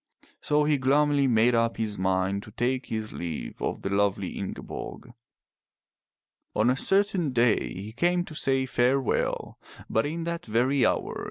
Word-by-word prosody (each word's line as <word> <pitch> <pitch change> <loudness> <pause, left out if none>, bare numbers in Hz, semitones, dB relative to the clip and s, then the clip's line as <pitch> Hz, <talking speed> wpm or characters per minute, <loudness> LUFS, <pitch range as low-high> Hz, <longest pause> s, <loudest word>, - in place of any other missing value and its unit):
So 150 0 +2
he 150 -1 +2
gloomily 140 +1 +3
made 120 0 +4
up 115 0 +1
his 105 -3 -3
mind 95 +1 0
to 105 - -13
take 125 +4 -1
his 110 -1 -4
leave 85 -3 -6
of - - -3
the 95 - -2
lovely 100 -1 +1
Ingeborg. 100 - -7 1.4
On 115 +3 +3
a - - +1
certain 195 -2 +2
day 120 -2 +2
he 100 +4 -7
came 175 +7 +1
to 160 - -10
say 135 -3 +1
farewell, 130 0 0 0.3
but 110 +6 +1
in 165 +3 -4
that 170 0 -3
very 125 +4 +2
hour. - - -2
125 Hz, 155 wpm, -27 LUFS, 105-145 Hz, 1.4 s, made